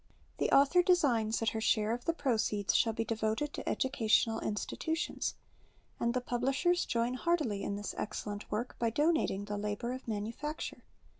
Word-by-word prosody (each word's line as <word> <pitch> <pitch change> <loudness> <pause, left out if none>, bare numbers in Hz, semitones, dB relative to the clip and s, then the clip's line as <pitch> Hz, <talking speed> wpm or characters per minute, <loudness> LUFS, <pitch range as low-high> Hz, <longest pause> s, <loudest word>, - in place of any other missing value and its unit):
The - - +2
author 285 +6 +6
designs 250 -12 +3
that 225 - +2
her 220 - -3
share 215 -1 +2
of 245 - -5
the 335 - +2
proceeds 220 -8 0
shall 225 - +3
be 225 +1 -2
devoted 220 +6 -1
to - - -4
educational 225 -3 +2
institutions; 320 +10 -2 0.6
and 235 +1 0
the 250 - +1
publishers 270 +9 +1
join 235 +1 0
heartily 255 -8 0
in 200 - -2
this 205 0 -4
excellent 205 0 -4
zvork 225 +4 -2
by 230 - +2
donating 290 - +1
the 205 0 -3
Ictbor 210 +4 -2
of 260 -1 -8
manufacture 230 +8 -4
235 Hz, 160 wpm, -32 LUFS, 215-280 Hz, 0.6 s, author